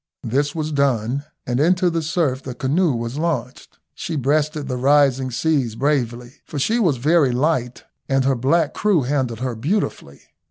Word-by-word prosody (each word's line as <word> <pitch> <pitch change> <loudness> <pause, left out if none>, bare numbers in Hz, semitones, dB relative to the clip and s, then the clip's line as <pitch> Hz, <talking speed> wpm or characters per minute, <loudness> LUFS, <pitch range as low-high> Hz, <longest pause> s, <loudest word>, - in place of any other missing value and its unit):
This 145 +6 -1
was 155 -1 -2
done, 140 -1 0 0.2
and 120 +1 -1
into 180 +3 +3
the 165 0 -1
surf 155 -5 -1
the 130 -2 -7
canoe 150 +6 +1
was 120 +4 -4
launched. 145 -6 -3 0.2
She 165 - -5
breasted 150 +1 0
the 130 - -2
rising 135 0 +3
seas 130 -2 0
bravely, 125 -2 -2
for 150 - -8
she 220 - +1
was 170 - +2
very 145 +1 +3
light, 125 -2 -1 0.3
and 135 -1 +2
her 135 - +3
black 145 +5 +1
crew 200 -9 +2
handled 125 -4 -1
her 130 -1 -2
beautifully. 120 - -3
140 Hz, 165 wpm, -21 LUFS, 125-155 Hz, 0.3 s, into